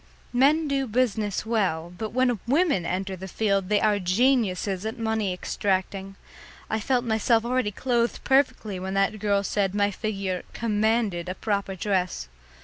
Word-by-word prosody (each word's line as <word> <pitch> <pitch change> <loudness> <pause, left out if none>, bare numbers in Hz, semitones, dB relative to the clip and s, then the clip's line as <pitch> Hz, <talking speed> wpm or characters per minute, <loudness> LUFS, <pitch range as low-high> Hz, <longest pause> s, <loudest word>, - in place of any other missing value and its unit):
Men 295 +5 +4
do 275 -1 0
business 215 -4 0
well, 180 -7 -1
but 215 +4 -4
when 245 -2 +1
women 280 - +2
enter 190 +1 -2
the 190 +1 -8
field 195 -1 0
they 210 -1 +3
are 210 -1 +2
geniuses 195 -2 +1
at 220 +3 -4
money 220 -3 0
extracting. 190 +1 -2 0.6
I 220 - +1
felt 250 +2 0
myself 225 0 +2
already 255 -2 +1
clothed 235 +2 -1
perfectly 245 -7 +1
when 190 +1 -4
that 195 +2 +1
girl 200 -1 +1
said 200 -1 0
my 205 0 +2
figure 195 -3 -3
"commanded" 215 -5 0
a 185 - -3
proper 200 -2 -2
dress. 185 - -1
210 Hz, 150 wpm, -25 LUFS, 190-235 Hz, 0.6 s, Men